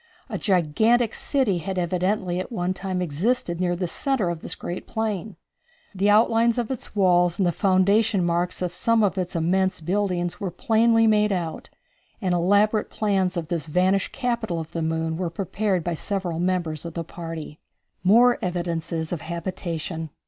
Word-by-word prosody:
A 205 Hz, -5 st, -3 dB
gigantic 215 Hz, +6 st, +2 dB
city 255 Hz, -11 st, +1 dB
had 190 Hz, +3 st, -4 dB
evidently 180 Hz, +1 st, 0 dB
at 185 Hz, -, -5 dB
one 180 Hz, -4 st, -1 dB
time 185 Hz, -1 st, -3 dB
existed 175 Hz, -, -1 dB
near 175 Hz, -1 st, +1 dB
the 180 Hz, 0 st, -2 dB
centre 235 Hz, -, 0 dB
of 165 Hz, -2 st, -6 dB
this -, -, -6 dB
great 175 Hz, -, -6 dB
plain. 215 Hz, -2 st, -3 dB, 0.6 s
The 200 Hz, +1 st, +1 dB
outlines 225 Hz, +2 st, +4 dB
of 240 Hz, 0 st, -1 dB
its 255 Hz, -4 st, -6 dB
walls 175 Hz, -3 st, +3 dB
and 195 Hz, -, +2 dB
the 175 Hz, -, +3 dB
foundation 195 Hz, +2 st, +2 dB
marks 175 Hz, +1 st, -1 dB
of 175 Hz, -1 st, -2 dB
some 230 Hz, +4 st, +2 dB
of 195 Hz, -2 st, +2 dB
its 180 Hz, -1 st, -3 dB
immense 185 Hz, +3 st, +1 dB
buildings 175 Hz, 0 st, -1 dB
were 195 Hz, -, -2 dB
plainly 225 Hz, +5 st, +3 dB
made 210 Hz, -1 st, +3 dB
out, 170 Hz, -4 st, -3 dB, 0.5 s
and 185 Hz, -4 st, 0 dB
elaborate 205 Hz, +5 st, +2 dB
plans 195 Hz, -4 st, 0 dB
of 165 Hz, -2 st, -4 dB
this 165 Hz, -4 st, -2 dB
vanished 185 Hz, +4 st, +1 dB
capital 235 Hz, -9 st, -2 dB
of 160 Hz, -1 st, -7 dB
the 165 Hz, -, -3 dB
moon 160 Hz, 0 st, -1 dB
were 180 Hz, -1 st, -2 dB
prepared 190 Hz, +1 st, -1 dB
by 175 Hz, -, -1 dB
several 180 Hz, -1 st, -2 dB
members 175 Hz, -4 st, -1 dB
of 170 Hz, -2 st, -7 dB
the 170 Hz, -, -2 dB
party. 165 Hz, -2 st, -7 dB, 0.4 s
More 240 Hz, +6 st, +5 dB
Evidences 170 Hz, -2 st, -3 dB
of 175 Hz, -, -3 dB
Habitation. 170 Hz, -2 st, -4 dB
185 Hz, 170 wpm, -24 LUFS, 170-210 Hz, 0.6 s, More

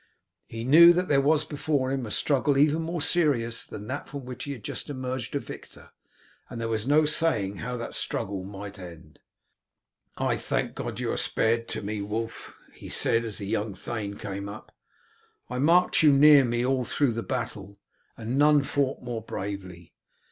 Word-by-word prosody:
He 115 Hz, 0 st, -6 dB
knew 165 Hz, +7 st, +8 dB
that 180 Hz, +1 st, -1 dB
there 140 Hz, -1 st, +4 dB
was 150 Hz, +2 st, +2 dB
before 145 Hz, -3 st, -1 dB
him 135 Hz, -4 st, -2 dB
a -, -, -7 dB
struggle 140 Hz, +4 st, +1 dB
even 150 Hz, +3 st, +3 dB
more 165 Hz, -1 st, -3 dB
serious 130 Hz, -10 st, +1 dB
than 105 Hz, -, -9 dB
that 140 Hz, +6 st, -5 dB
from 140 Hz, -3 st, -7 dB
which 125 Hz, 0 st, -6 dB
he 145 Hz, -, -4 dB
had 120 Hz, -6 st, -11 dB
just -, -, -5 dB
emerged 130 Hz, -2 st, -4 dB
a -, -, +1 dB
victor, -, -, -11 dB, 0.6 s
and 115 Hz, -, -7 dB
there 115 Hz, -, -2 dB
was 110 Hz, +1 st, -2 dB
no 150 Hz, +2 st, +4 dB
saying 110 Hz, -11 st, +1 dB
how 125 Hz, +3 st, -4 dB
that 115 Hz, -, -6 dB
struggle 95 Hz, -1 st, -3 dB
might 100 Hz, +1 st, -9 dB
end. 85 Hz, -4 st, -12 dB, 1.0 s
"I -, -, 0 dB
thank -, -, -2 dB
God -, -, -5 dB
that -, -, -5 dB
you -, -, -1 dB
are -, -, -2 dB
spared 115 Hz, +1 st, 0 dB
to -, -, -5 dB
me, 105 Hz, 0 st, -3 dB
Wulf," 110 Hz, +3 st, -5 dB, 0.2 s
he -, -, -11 dB
said 115 Hz, 0 st, +1 dB
as 110 Hz, -2 st, -3 dB
the 100 Hz, -, -4 dB
young 105 Hz, -1 st, -2 dB
thane 100 Hz, 0 st, -5 dB
came 100 Hz, +1 st, -6 dB
up. 105 Hz, +2 st, -10 dB, 0.8 s
"I 125 Hz, -, -2 dB
marked 175 Hz, +7 st, +4 dB
you 155 Hz, -2 st, +6 dB
near 140 Hz, 0 st, +7 dB
me 120 Hz, 0 st, 0 dB
all 130 Hz, 0 st, +1 dB
through 135 Hz, +2 st, +1 dB
the 115 Hz, -, -3 dB
battle, 110 Hz, -5 st, -5 dB, 0.4 s
and 120 Hz, +4 st, -2 dB
none 150 Hz, -1 st, +5 dB
fought 140 Hz, -2 st, -1 dB
more 120 Hz, -2 st, -4 dB
bravely. 95 Hz, -5 st, -7 dB
120 Hz, 190 wpm, -26 LUFS, 105-145 Hz, 1.0 s, knew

